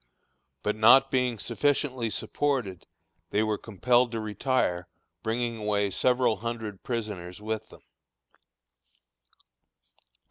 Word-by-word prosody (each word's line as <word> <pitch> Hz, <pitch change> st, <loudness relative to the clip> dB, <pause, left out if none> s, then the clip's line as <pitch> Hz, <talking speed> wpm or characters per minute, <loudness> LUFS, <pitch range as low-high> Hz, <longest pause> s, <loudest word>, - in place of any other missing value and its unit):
But 105 Hz, -, 0 dB
not 115 Hz, +5 st, +6 dB
being 125 Hz, -3 st, +1 dB
sufficiently 130 Hz, 0 st, 0 dB
supported, 125 Hz, -7 st, -2 dB, 0.4 s
they 105 Hz, -, +2 dB
were 110 Hz, -1 st, -1 dB
compelled 120 Hz, +3 st, +2 dB
to 115 Hz, -, -1 dB
retire, 105 Hz, -5 st, -1 dB, 0.3 s
bringing 115 Hz, +2 st, -1 dB
away 105 Hz, -2 st, 0 dB
several 125 Hz, +2 st, +2 dB
hundred 110 Hz, -4 st, -5 dB
prisoners 105 Hz, -7 st, -4 dB
with 110 Hz, 0 st, -4 dB
them. -, -, -16 dB
110 Hz, 100 wpm, -28 LUFS, 105-125 Hz, 0.4 s, not